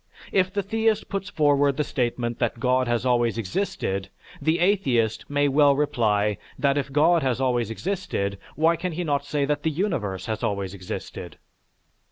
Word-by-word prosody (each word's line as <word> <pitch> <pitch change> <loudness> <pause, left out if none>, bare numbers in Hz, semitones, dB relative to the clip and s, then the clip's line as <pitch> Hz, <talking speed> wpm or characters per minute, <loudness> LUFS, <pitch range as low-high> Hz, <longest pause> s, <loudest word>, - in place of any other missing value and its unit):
If 185 -1 +2
the 200 +1 -1
theist 220 +1 0
puts 195 -1 -3
forward 145 -2 +2
the 150 - +2
statement 120 -3 -2
that 120 -1 -1
God 130 0 +2
has 120 +1 0
always 120 -2 +2
existed, 100 - -2 0.3
the 160 +3 +2
atheist 135 - +1
may 145 0 +2
well 140 0 +4
reply 105 -7 +1 0.2
that 140 -2 +2
if 135 -2 -2
God 160 +4 +4
has 130 -3 0
always 120 -4 +1
existed, 115 - -3 0.2
why 165 +2 +3
can 180 +1 -3
he 175 +3 -2
not 145 -3 0
say 145 -1 0
that 145 +1 -1
the 160 - +1
universe 120 - -2
has 110 -1 -3
always 100 -2 -2
existed? 90 -3 -7
140 Hz, 170 wpm, -25 LUFS, 115-160 Hz, 0.3 s, well